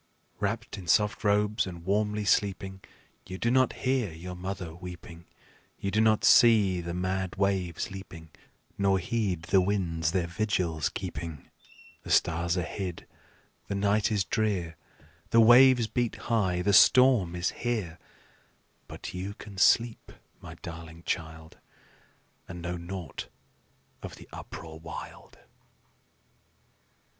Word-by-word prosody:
Wrapped 100 - -3
in 90 - -10
soft 105 +7 +2
robes 105 0 +2
and 85 -2 -9
warmly 105 +1 0
sleeping, 95 -1 0 0.5
You 95 0 -6
do 115 +4 0
not 130 0 +3
hear 130 -7 +1
your 85 +3 -8
mother 90 -2 -6
weeping; 85 -1 -10 0.5
You 100 - -3
do 110 +3 +2
not 110 -1 +3
see 105 -6 +5
the 85 0 -5
mad 95 0 -2
waves 95 -4 -1
leaping, 85 -5 -10 0.5
Nor 100 -1 +3
heed 95 -3 -2
the 95 +2 +3
winds 85 -5 0
their 90 -2 0
vigils 85 -4 -1
keeping. 80 -4 -7 0.5
The - - -11
stars 85 +1 +2
are 90 - 0
hid, 90 +1 -5 0.6
the 100 - -3
night 100 +2 +1
is 105 -3 +1
drear, 95 -6 -1 0.5
The 115 - +4
waves 120 +1 +7
beat 120 +1 -1
high, 95 -6 0
the 100 - +2
storm 115 -4 +6
is 90 +1 -1
here; 105 -9 -3 0.9
But - - -8
you 95 +2 -5
can 100 -3 -10
sleep, 115 +4 +3 0.3
my - - -10
darling 85 0 -9
child, 80 0 -5 0.9
And 90 -1 -8
know 90 +1 -3
naught 85 0 -7 0.7
of - - -8
the - - -14
uproar 80 -1 -9
wild." 80 0 -10
95 Hz, 130 wpm, -28 LUFS, 85-105 Hz, 0.9 s, waves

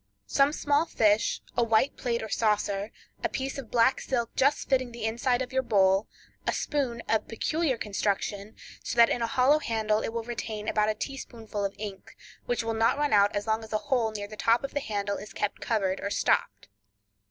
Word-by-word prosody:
Some 275 +1 +3
small 295 +1 +1
fish, 215 -4 +2
a 240 - +3
white 225 +4 +2
plate 235 -2 -2
or - - -4
saucer, 210 -1 0 0.3
a - - +1
piece 270 +1 -3
of 245 -5 -8
black 245 +2 +3
silk 235 -3 -2
just 280 +2 +2
fitting 255 -2 +1
the 235 -1 -5
inside 245 +3 +1
of 255 - -9
your 260 - +2
bowl, 195 -4 +3 0.4
a - - +2
spoon 255 -6 -2
of 220 - +1
peculiar 290 +4 0
construction, 205 0 -2 0.3
so - - -3
that 235 -1 +6
in 245 - 0
a 230 - +1
hollow 270 +4 +4
handle 220 -4 0
it - - -2
will 230 0 -3
retain 220 -2 -5
about 215 -1 +2
a 215 - 0
teaspoonful 225 -4 -5
of 200 0 -2
ink, 200 -2 -8 0.3
which 245 -1 0
will 225 0 -1
not 225 +4 +2
run 295 -3 +1
out 205 0 +4
as 205 - -1
long 220 0 0
as 220 - -9
a - - +3
hole 240 -4 +3
near 205 -1 -5
the 215 - -9
top 230 +3 +2
of 275 - -5
the 285 - 0
handle 205 -5 -2
is 205 -1 -9
kept 210 - -2
covered 195 -4 0
or 200 - -2
stopped. - - 0
225 Hz, 210 wpm, -28 LUFS, 210-255 Hz, 0.4 s, that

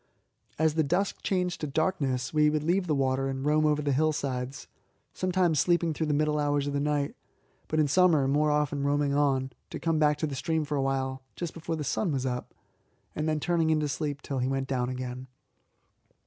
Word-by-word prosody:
As 160 0 +2
the 160 - +2
dusk 180 +7 0
changed 180 -2 -1
to 150 - -2
darkness 140 -4 -1
we 150 -1 +4
would 150 0 0
leave 180 +3 +1
the 155 - +1
water 135 0 +1
and 135 0 -4
roam 155 +1 +3
over 150 0 +1
the 145 - +1
hillsides, 140 -3 -1 0.5
sometimes 180 -4 +1
sleeping 170 -1 +2
through 160 +1 -2
the 150 - +1
middle 150 0 +1
hours 145 -1 +1
of 145 - -2
the 140 - 0
night, 145 -1 0 0.5
but 155 - 0
in 150 - +4
summer 155 -2 +4
more 150 +2 +2
often 150 -1 0
roaming 145 0 +1
on, 135 -2 +1 0.2
to - - -6
come 165 -2 0
back 150 -1 +3
to 155 - -1
the 145 - -4
stream 160 +3 -1
for 150 0 -2
a 140 - +1
while 135 0 -1
just 175 -2 -4
before 165 0 -4
the 155 - -4
sun 160 - 0
was 135 -2 -1
up, 125 -1 -4 0.6
and 155 +1 -1
then 155 -1 0
turning 165 0 +1
in 155 -1 +3
to 150 - 0
sleep 145 0 -3
till 135 -2 -3
he 125 - 0
went 135 0 -1
down 125 -2 -1
again. 130 0 -5
150 Hz, 215 wpm, -28 LUFS, 135-160 Hz, 0.6 s, we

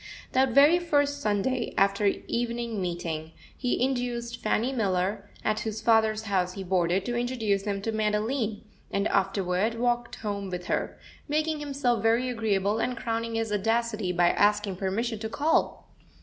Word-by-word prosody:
That 265 +1 +3
very 295 +5 +7
first 285 -4 +1
Sunday, 230 +4 0
after 200 +1 +3
evening 235 0 -2
meeting, 165 -3 -4 0.2
he 250 -1 -1
induced 245 -2 -2
Fanny 230 +4 +1
Miller, 200 -2 -1 0.2
at 215 0 +1
whose 220 -1 -3
father's 220 -1 +3
house 185 -4 0
he 195 - -6
boarded, 180 0 +1
to 240 - -2
introduce 225 -5 0
him 200 -1 -2
to 225 - -1
Madeline, 215 +1 -1 0.3
and 200 +2 0
afterward 195 +2 +1
walked 240 0 0
home 200 -2 -4
with 180 -1 -5
her, - - -2 0.3
making 310 +1 0
himself 275 -5 0
very 230 +3 +2
agreeable, 215 -3 0
and 250 +1 -1
crowning 230 0 -2
his 225 -1 -1
audacity 220 -1 0
by 175 -1 +3
asking 205 -2 +2
permission 215 +4 -2
to 220 0 -4
call. 300 +7 0
220 Hz, 150 wpm, -27 LUFS, 200-240 Hz, 0.3 s, very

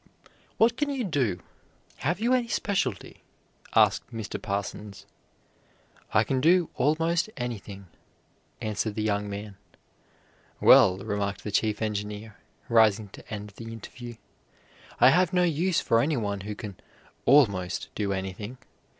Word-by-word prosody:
"What 230 +2 +4
can 295 -1 0
you 270 -3 -2
do? 130 - 0 0.6
Have 175 +6 -1
you 235 +3 +2
any 250 -2 +2
specialty?" 190 - -2 0.5
asked - - +3
Mr. 110 -3 -5
Parsons. 100 0 -5 1.1
"I - - +4
can 130 -1 -1
do 170 +3 +4
almost 165 +6 +1
anything," 105 -5 -6 0.8
answered 110 -1 -2
the 110 - -1
young 105 -1 0
man. 100 0 -7 1.0
"Well," 95 - +7
remarked 100 -1 -2
the 105 - -4
Chief 105 +1 0
Engineer, 105 0 -4 0.3
rising 110 -3 +4
to - - -14
end 105 -1 -5
the 115 -1 -8
interview, 120 +1 -9 0.8
"I 125 - +8
have 180 +3 +3
no 180 0 +4
use 175 +1 +1
for 115 - +3
anyone 115 -9 -1
who 105 +2 -5
can 100 -4 -8 0.5
'almost' 100 -11 +3
do 100 -2 -2
anything. 95 +5 -5
110 Hz, 130 wpm, -27 LUFS, 100-155 Hz, 1.1 s, I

